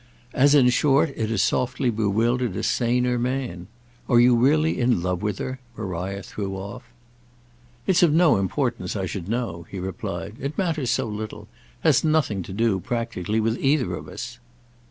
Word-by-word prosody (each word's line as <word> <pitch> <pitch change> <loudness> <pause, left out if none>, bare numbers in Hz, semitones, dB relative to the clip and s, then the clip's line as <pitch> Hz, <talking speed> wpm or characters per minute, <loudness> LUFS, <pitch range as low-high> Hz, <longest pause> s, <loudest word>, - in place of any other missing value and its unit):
"As 145 +2 +5
in 130 -4 +6
short 140 +4 +3
it 110 -1 -2
has 110 -4 +1
softly 125 0 0
bewildered 115 +1 0
a - - -3
saner 125 +1 +1
man. 125 -8 -3 0.4
Are 120 - +5
you 120 0 +6
really 150 +6 +3
in 120 -8 +2
love 90 -1 -1
with 105 -2 -2
her?" 130 0 -4 0.2
Maria 95 -1 -4
threw 95 +1 -5
off. 100 +6 -7 1.0
"It's 185 -2 +3
of 170 -4 +5
no 160 - +5
importance 120 +6 -1
I 95 -2 -1
should 95 0 -5
know," 105 -9 -3
he 100 - -7
replied. 90 +1 -5
"It 140 +3 -4
matters 160 -9 0
so 130 +2 +1
little—has 110 -1 -2
nothing 155 -11 +1
to 90 - -8
do, 105 -1 +1
practically, 115 -3 -2
with 115 +2 0
either 135 -9 +2
of 75 -3 -6
us." 120 +6 -7
115 Hz, 165 wpm, -24 LUFS, 100-130 Hz, 1.0 s, in